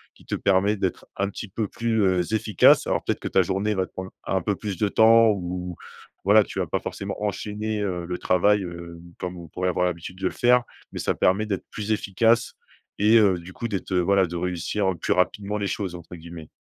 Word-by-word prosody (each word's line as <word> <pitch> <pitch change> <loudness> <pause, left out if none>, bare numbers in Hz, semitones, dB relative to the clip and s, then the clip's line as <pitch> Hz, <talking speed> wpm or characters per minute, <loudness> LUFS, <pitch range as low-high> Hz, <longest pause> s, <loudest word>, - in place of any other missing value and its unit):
qui - - -20
te - - -2
permet 100 +2 +2
d'être 95 -2 -3
un 100 0 0
petit 105 +1 -7
peu 110 +2 -2
plus, 115 +1 -1
heu, 95 +1 +1
efficace. 105 -3 +4
Alors - - 0
peut-être - - -1
que - - -5
ta 95 - +3
journée 95 +4 0
va 95 -1 0
te - - -22
prendre 95 0 -7
un 95 - 0
peu 100 +4 -1
plus 100 -2 -5
de 105 - +1
temps 115 +2 +6
ou 90 -2 -4 0.5
voilà, 105 +2 +6
tu - - -9
vas - - 0
pas - - -1
forcément - - -6
enchaîner, 105 +1 -3
heu, 90 -3 -2
le 90 0 -3
travail, 100 +3 +2
heu, 85 -1 -8 0.2
comme 90 0 -5
on 85 - -9
pourrait 90 +4 -2
avoir 90 0 +1
l'habitude 90 +1 -4
de 95 - -3
le - - -2
faire. 125 0 +4 0.3
Mais - - -8
ça - - 0
permet 100 +4 +2
d'être 100 -3 -3
plus 105 0 -4
efficace 115 +3 +2 0.4
et, 105 +3 +5
heu, 100 -5 +4
du 85 +2 -11
coup 115 - -4
d'être 100 -4 -4
heu, 90 - +2
voilà, 95 +2 +3
de 85 0 -7
réussir 90 +3 -1
«plus - - +1
rapidement» 100 +3 0
les 100 - -1
choses, 95 -3 -3
entre 85 +1 -10
guillemets. 85 -1 -10
95 Hz, 225 wpm, -24 LUFS, 90-105 Hz, 0.5 s, temps